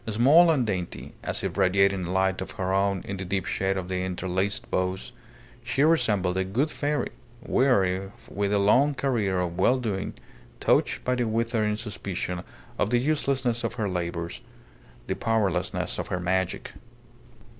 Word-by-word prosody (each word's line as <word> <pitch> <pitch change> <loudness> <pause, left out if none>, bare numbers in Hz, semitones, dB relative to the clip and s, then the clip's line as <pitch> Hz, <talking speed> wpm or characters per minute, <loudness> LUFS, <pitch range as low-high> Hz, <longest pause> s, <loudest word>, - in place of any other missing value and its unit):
Small 135 +11 +6
and 140 -7 +3
dainty, 95 -5 -4
as - - -2
if - - -3
radiating 95 0 +3
a 85 - -4
light 95 0 +1
of 95 - -5
her 95 0 -2
own 100 -1 +1
in 100 - -4
the 95 - -4
deep 95 +1 -1
shade 95 0 0
of 90 -2 -4
the 90 0 -2
interlaced 95 +2 -2
boughs, 95 +1 -1 0.5
she 140 - +1
resembled 105 - +2
a 95 - +2
good 125 +12 0
fairy, 145 0 -1 0.3
weary 95 -7 +2 0.2
with 100 0 -2
a 105 - +3
long 130 +9 +4
career 110 -9 0
of 90 0 -2
well 125 +7 +4
doing, 105 -6 -3 0.4
touched - - +2
by 125 - +1
the 125 -2 0
withering 110 -1 0
suspicion 95 -5 -4 0.4
of - - +2
the 120 - +3
uselessness 135 -3 0
of - - -2
her 110 -4 -1
labours, 85 -2 -3 0.6
the - - -1
powerlessness 110 -6 0
of - - -3
her 90 - -2
magic. 90 0 -1
100 Hz, 165 wpm, -26 LUFS, 95-120 Hz, 0.6 s, Small